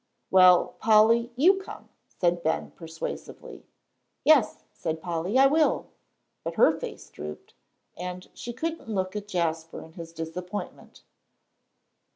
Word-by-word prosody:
"Well, 185 -1 +6
Polly, 225 +2 +4
you 365 +9 +5
come," - - -11 0.2
said 175 -1 0
Ben, 160 0 -1
persuasively. 165 -1 -8 0.6
"Yes," 280 -9 +4
said 160 0 -4
Polly, 175 +6 -2
"I 270 - +7
will;" 300 0 +2 0.5
but - - -4
her - - +6
face - - -8
drooped, 75 +1 -9 0.4
and 180 +1 -6
she 240 - -7
couldn't 320 +1 -5
look 190 -2 -2
at 205 -1 -5
Jasper 165 -4 -2
in 160 - -15
his 165 -1 -9
disappointment. 175 +4 -7
185 Hz, 125 wpm, -27 LUFS, 165-235 Hz, 0.6 s, I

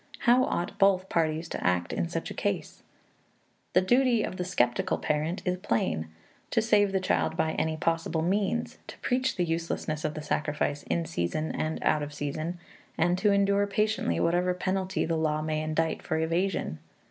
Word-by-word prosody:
How 245 +2 +5
ought 175 +3 -3
both 190 -2 +4
parties 160 0 0
to - - -4
act 90 -1 +1
in 85 -1 -1
such - - -3
a - - -4
case? - - -3 0.9
The 185 - +5
duty 240 +2 +3
of 185 - -4
the 180 - -1
skeptical 125 -9 +1
parent 155 +5 -1
is 180 0 0
plain: 80 - -1 0.4
to 230 - +2
save 210 -3 +3
the 190 - +1
child 170 -3 0
by 160 - +1
any 160 0 -1
possible 165 0 0
means, 200 +6 0
to - - -9
preach 260 +1 0
the 180 - +1
uselessness 165 -2 -2
of 155 -1 -2
the 155 - -5
sacrifice 150 -1 -1
in 170 -1 0
season 155 - -2
and 155 0 -2
out 150 - +3
of 145 0 -5
season, 155 +4 -3 0.4
and 175 +2 +3
to 205 +1 +3
endure 200 0 +3
patiently 210 - 0
whatever 180 - +2
penalty 190 +1 -1
the 165 - 0
law 155 -1 +1
may 155 0 -1
indict 155 +1 -1
for 160 - -2
evasion. 165 - -1
165 Hz, 180 wpm, -28 LUFS, 155-195 Hz, 0.9 s, How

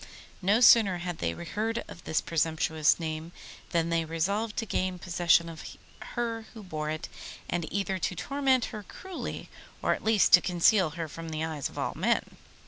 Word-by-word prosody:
No 205 +5 +3
sooner 215 -6 +7
had 175 -1 -5
they 85 0 -1
heard 215 - -3
of 175 - -12
this 160 - +1
presumptuous 160 -1 +1
name 160 0 -4 0.4
than 170 -1 +1
they 165 -1 +1
resolved 200 +7 -1
to 225 - -1
gain 185 -2 -1
possession 175 -1 +3
of 165 -1 -8 0.5
her 230 -2 -2
who 220 - -9
bore 155 -4 -4
it, 155 0 -4 0.4
and 170 -3 -3
either 195 -1 -1
to 180 - -1
torment 265 +4 +1
her 215 - -5
cruelly, 370 - -7 0.3
or - - +2
at - - -6
least 220 -2 +3
to 180 - +10
conceal 180 +1 +3
her 165 -1 -3
from 165 +2 -8
the 155 0 -3
eyes 155 -4 -3
of - - -15
all - - -1
men. - - 0
175 Hz, 180 wpm, -29 LUFS, 160-210 Hz, 0.5 s, to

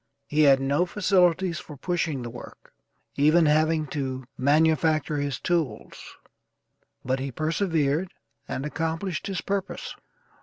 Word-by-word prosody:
He 150 +1 +1
had 140 -2 +6
no 140 +6 +1
facilities 180 -2 +2
for 150 - -11
pushing 160 -4 -2
the 120 - -5
work, 120 - -12 0.4
even 155 +4 +5
having 155 +1 +2
to 130 -3 -3
manufacture 155 +2 +2
his 145 -2 -2
tools, 170 -6 -3 0.9
but 130 +1 0
he 135 +1 -4
persevered 160 - 0 0.4
and 135 - -4
accomplished 165 +3 -3
his 195 -2 -3
purpose. 195 -1 -3
155 Hz, 120 wpm, -26 LUFS, 140-170 Hz, 0.9 s, had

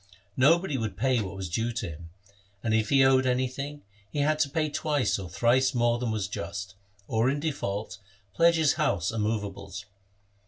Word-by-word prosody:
No 145 +6 +6
body 170 -7 -3
would 105 -5 -4
pay 130 -3 +2
what 100 -1 -5
was 95 -1 -4
due 115 +8 -1
to 115 -2 -3
him; 80 +1 -10 0.5
and 110 -2 0
if 110 -1 +2
he 135 -1 +5
owed 130 0 +4
anything, 130 +3 -2 0.3
he 145 - -7
had 155 +1 +2
to 150 -2 +2
pay 155 +2 0
twice 145 -9 0
or 95 -3 -7
thrice 130 +4 +2
more 120 0 +2
than 125 -1 -2
was 110 -3 -1
just, 100 +1 -5 0.3
or, 115 +3 +2
in 140 +2 0
default, 105 -9 -3 0.3
pledge 170 +8 +4
his 160 -4 +3
house 90 -2 +1
and 110 -1 -2
movables. 100 -2 -3
120 Hz, 190 wpm, -27 LUFS, 100-140 Hz, 0.5 s, No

